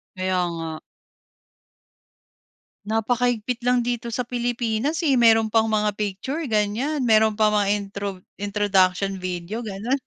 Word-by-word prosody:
Kaya 185 -1 0
nga. 165 -1 -5 2.1
Napakahigpit 235 +1 0
lang 245 0 +2
dito 240 -1 -2
sa 245 +2 -2
Pilipinas, 245 +5 -1
eh, 280 - +4
meron 225 -3 +4
pang 225 0 +3
mga 210 -1 +1
picture, 210 - -3
ganyan. 230 +7 0
Meron 220 -2 +4
pang 215 -1 +3
mga 205 -1 +2
introv 200 -1 -5 0.2
introduction 195 -2 +1
video 180 +4 -4
gano'n. 225 +5 -2
220 Hz, 120 wpm, -23 LUFS, 200-240 Hz, 2.1 s, eh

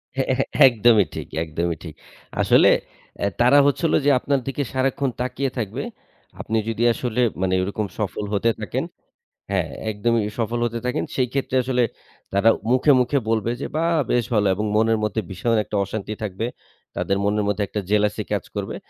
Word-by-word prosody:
হ্যাঁ, 135 0 -1
এ - - 0 0.3
একদমই 115 -3 +4
ঠিক - - -5 0.2
একদমই 85 +1 -2
ঠিক। 80 -3 -8 0.5
আসলে - - +5 0.6
এ - - +3
তারা 125 +4 +6
হচ্ছে 145 +4 +1
হল - - +2
যে, - - +5
আপনার 140 +1 0
দিকে 135 +1 -1
সারাক্ষণ 135 +1 0
তাকিয়ে 135 +2 -1
থাকবে। 110 -5 -3 0.6
আপনি 110 - -1
যদি 115 +1 -1
আসলে 125 0 -2 0.2
মানে 95 -1 +1
ওরকম 100 +2 -2
সফল 105 0 -2
হতে 105 +3 +2
থাকেন - - -2 0.7
হ্যাঁ, - - 0 0.2
একদমই। 110 +2 +1 0.2
সফল 120 +1 -1
হতে 115 0 -2
থাকেন 125 - -1
সেইক্ষেত্রে 130 +1 -1
আসলে 125 -1 +1 0.5
তারা 100 +3 +4 0.2
মুখে, 130 +4 +4
মুখে 125 +3 +1
বলবে 115 +1 +1
যে, - - -2
"বাহ! 165 +1 +1 0.2
বেশ 120 -2 +2
ভালো," 105 -2 +3
এবং 105 +3 -2
মনের 110 +1 +3
মধ্যে 105 +1 0
ভীষণ 105 +5 0
একটা 105 - -6
অশান্তি 105 +2 -5
থাকবে। 105 +2 -3 0.5
তাদের 100 - 0
মনের 105 +1 +1
মধ্যে 105 0 0
একটা 105 - -3
jealousy 105 0 +1
কাজ - - 0
করবে। - - -3
115 Hz, 170 wpm, -22 LUFS, 105-125 Hz, 0.7 s, তারা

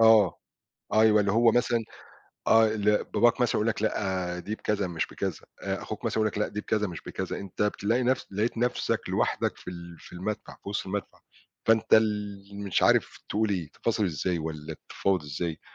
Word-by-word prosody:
آه. 110 -4 +6 0.6
أيوَه، 110 -1 +6
اللي 100 -1 +1
هو 115 0 +5
مثلًا، 120 0 +2 0.7
آه، 110 0 +6
اللي 105 -1 +2
باباك 120 +2 +4
مثلًا 120 - +2
يقول 105 - +1
لك 110 - -1
لأ، 95 -4 -1
دي 105 +4 -4
بكذا 105 -3 -1
مش 85 -2 -1
بكذا، - - -4 0.2
آآ، - - -2
أخوك - - -6
مثلًا - - -1
يقول 110 -1 +3
لك، 105 - -5
لأ، 105 - +1
دي 105 - -4
بكذا 105 -1 0
مش 85 -4 -7
بكذا، - - -4
أنت 100 +1 -4
بتلاقي 105 +4 +1
نفسك 125 -4 0
لقيت 110 +4 0
نفْسك 125 +1 +1
لوحدك - - 0
في - - -8
ال 85 -1 -9
في - - -14
المدفع، 100 +4 -4
في - - -8
وسط 100 - -2
المدفع 100 +1 -4 0.5
فأنت 110 -1 +5
ال 105 -2 +2 0.2
مش 100 -3 0
عارف - - +3
تقول 110 +1 +1
إيه، 90 -6 -1
تفاصل 110 -2 -1
إزاي 90 0 -1
والّا 80 -1 -5
بتتفاوض 95 -4 -1
إزاي. 80 +2 -4
105 Hz, 190 wpm, -28 LUFS, 90-110 Hz, 0.7 s, آه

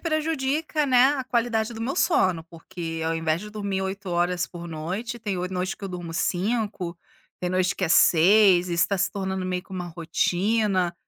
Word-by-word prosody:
prejudica, 310 -1 -1
né, 260 +2 +5
a 265 -2 -3
qualidade 235 -2 0
do 225 - -8
meu 270 +8 -2
sono, 185 - +2
porque 165 -1 -7
ao 165 0 0
invés 160 0 0
de 210 - -8
dormir 200 -2 -3
8 190 0 -4
horas 175 +1 0
por 175 -1 -9
noite, 185 +10 -4
tem 205 -4 -3
o 180 - -2
noite 185 +1 -2
que - - -9
eu 195 - -4
durmo 175 -2 -6
5, 185 -1 -1 0.4
tem 180 - -1
noite 185 0 +1
que 185 - -1
é 165 - -1
6 180 +2 +5
e 170 - -1
isso 170 - +3
tá 200 - 0
se 195 - +1
tornando 190 -2 -3
meio 180 -1 -2
que 195 - -29
uma 180 -2 -4
rotina. 180 +3 0
190 Hz, 200 wpm, -25 LUFS, 175-220 Hz, 0.4 s, né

